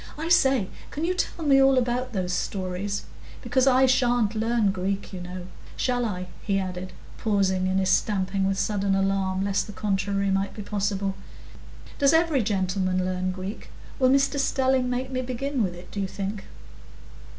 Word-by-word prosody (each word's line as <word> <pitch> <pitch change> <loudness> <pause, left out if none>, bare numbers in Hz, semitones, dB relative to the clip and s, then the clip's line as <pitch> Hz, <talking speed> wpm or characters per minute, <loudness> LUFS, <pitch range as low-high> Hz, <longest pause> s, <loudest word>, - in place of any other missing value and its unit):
"I 320 +2 -3
say, 265 - +4 0.2
can 305 +3 -3
you 360 - +1
tell 350 -2 -3
me 275 -2 +6
all 270 0 +5
about 250 +1 0
those 185 -4 -2
stories? 190 +2 -2 0.4
Because 260 0 +2
I 265 0 +6
sha'n't 245 -4 +2
learn 225 -2 +1
Greek, 195 +1 -3
you 185 - -5
know. 180 0 -7 0.3
Shall 245 -1 0
I?" 185 -4 -3 0.2
he 200 -1 0
added, 185 -1 -4 0.3
pausing 190 -3 +1
in 190 0 +1
his 190 0 +2
stamping 195 -1 +1
with 195 0 0
a - - -1
sudden 200 -2 +1
alarm, 195 -1 0
lest 195 -1 0
the 210 - -8
contrary 195 -1 0
might 195 +1 0
be 210 - -6
possible. 200 -1 -1 0.9
"Does 280 +1 +5
every 320 -4 +3
gentleman 185 -3 0
learn 185 0 -1
Greek? 190 +3 -7 0.3
Will 255 -1 +4
Mr 275 +1 +3
Stelling 265 -2 +2
make 255 +1 -2
me 255 0 -1
begin 260 +1 -2
with 185 -4 -1
it, 175 +1 -12
do 205 - -5
you 195 - -1
think?" 200 +1 -5
200 Hz, 175 wpm, -25 LUFS, 190-255 Hz, 0.9 s, me